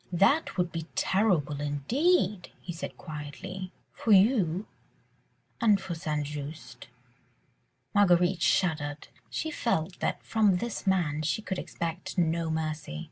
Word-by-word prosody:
"That 200 - +3
would 180 -1 +1
be 165 -1 -5
terrible 170 -8 +1
indeed," 205 - +1
he 175 - -6
said 165 - -6
quietly, 180 +5 -7 0.2
"for 225 - -1
you... 195 -3 +4 1.0
and 210 -3 +5
for 190 -2 -5
St. 155 -3 -2
Just." 145 -3 -7 1.1
Marguerite 180 -3 +4
shuddered. 150 -4 +1 0.2
She 320 - -3
felt 180 - -1
that - - -1
from 210 -5 +3
this 235 0 -4
man 170 -6 +2
she 160 +8 -1
could 190 -3 -3
expect 170 +3 -5
no 165 -1 +1
mercy. 155 - -3
175 Hz, 125 wpm, -29 LUFS, 155-195 Hz, 1.1 s, and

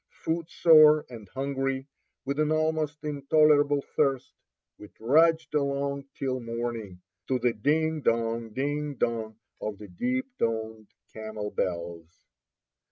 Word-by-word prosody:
Footsore 160 -2 +5
and 110 -5 -10
hungry, 135 +1 -2 0.4
with 140 +2 -2
an 155 0 +2
almost 155 -1 0
intolerable 145 0 +3
thirst, 135 -2 +1 0.5
we 105 - -10
trudged 160 +8 +2
along 140 -1 -1
till 130 -1 -2
morning, 115 -6 -5 0.2
to 130 - +1
the 120 -1 +1
ding 155 +7 0
dong, 115 -1 0
ding 145 +4 -2
dong 110 -3 -2 0.3
of 105 -1 -4
the 105 -1 -11
deep 255 - -1
toned 110 -1 -2 0.3
camel 110 -1 -6
bells. 85 -2 -3
135 Hz, 115 wpm, -27 LUFS, 115-150 Hz, 0.5 s, Footsore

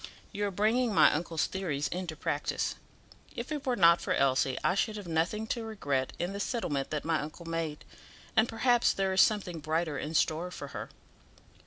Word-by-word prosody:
"You 205 0 -1
are - - -3
bringing 220 +3 +1
my - - +7
uncle's 165 0 -1
theories 155 -7 -2
into 175 -3 -4
practice. - - -1 0.6
If 240 +4 -5
it 295 -3 -4
were 250 - +2
not 170 -4 +6
for - - 0
Elsie 130 -1 +2
I - - +3
should 215 +2 0
have 205 -4 -7
nothing 170 +7 0
to 235 - -5
regret 145 -12 -2
in 175 +3 -2
the 200 - -5
settlement 175 - -2
that 150 -1 -3
my 160 -2 +1
uncle 155 +3 -8
made; 165 -2 -3 0.5
and, 220 +1 +4
perhaps, 240 +1 +3
there 195 -1 0
is 190 - +6
something 190 -6 +2
brighter 155 -1 -1
in 155 +2 -4
store 160 +3 +1
for - - -7
her." - - -6
175 Hz, 190 wpm, -30 LUFS, 155-215 Hz, 0.6 s, my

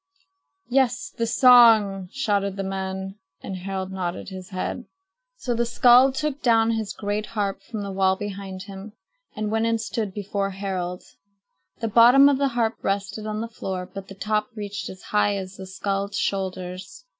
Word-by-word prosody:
"Yes, 265 +1 +1
the 230 - -1
song!" 225 -7 +6
shouted 200 -7 0
the 195 - -2
men, 190 +1 -4 0.2
and 190 - -5
Harald 190 0 -4
nodded 185 -1 -4
his 185 0 -9
head. 200 +5 -4 0.5
So 245 - -2
the 235 0 +1
skald 250 +2 +5
took 300 -1 -2
down 225 -2 +4
his 220 -3 -2
great 210 +1 -3
harp 200 -3 -2
from 210 +1 -6
the 200 - -5
wall 190 0 +2
behind 195 -1 -6
him 195 +1 -10 0.4
and 215 0 -3
went 225 +1 +1
and 230 0 +1
stood 220 -2 -3
before 200 0 -2
Harald. 185 -2 -4 0.8
The 225 - 0
bottom 245 +6 +7
of 275 -2 +1
the 280 - +3
harp 225 -1 +1
rested 200 +2 -2
on 215 0 -3
the 230 - -3
floor, 190 -5 -5
but 195 -1 -7
the 195 - -10
top 210 +1 -1
reached 205 -2 -5
as 185 - -11
high 205 -1 +1
as 190 -1 -6
the 190 - -8
skald's 195 +1 -3
shoulders. 185 -6 -4
200 Hz, 170 wpm, -24 LUFS, 190-225 Hz, 0.8 s, bottom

